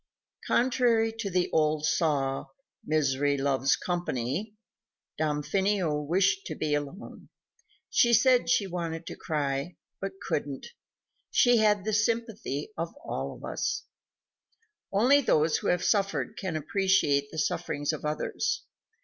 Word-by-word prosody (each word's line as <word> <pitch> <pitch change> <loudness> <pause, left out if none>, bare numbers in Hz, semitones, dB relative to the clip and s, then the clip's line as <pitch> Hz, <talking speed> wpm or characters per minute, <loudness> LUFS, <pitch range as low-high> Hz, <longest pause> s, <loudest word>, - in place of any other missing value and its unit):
_ - - -9
Contrary 240 -3 +3
to 220 -2 -4
the 180 -1 +1
old 155 -1 +2
saw, 140 -4 0 0.4
"Misery 145 -4 +1
loves 135 -1 +2
company," 175 - -3 0.6
Damfino 155 +2 0
wished 190 +5 +1
to 155 - -4
be 150 -1 -1
alone. 145 +8 -5 0.6
She 240 - +3
said 245 +2 +4
she 200 - +3
wanted 170 -3 -4
to - - -7
cry, 145 +1 -2 0.2
but 195 0 -5
couldn't. 140 -2 -3 0.6
She 245 -1 +4
had 210 -3 +3
the 215 - -1
sympathy 215 - -1
of 165 - -2
us - - -21
all. - - -5 1.4
Only 250 +8 +5
those 155 - +2
who - - -4
have 180 0 +1
suffered 200 -1 0
can 185 -5 -4
appreciate 155 -3 +2
the 160 - -9
sufferings 145 0 -1
of 155 - -6
others. 150 0 -2
170 Hz, 125 wpm, -28 LUFS, 150-210 Hz, 1.4 s, Only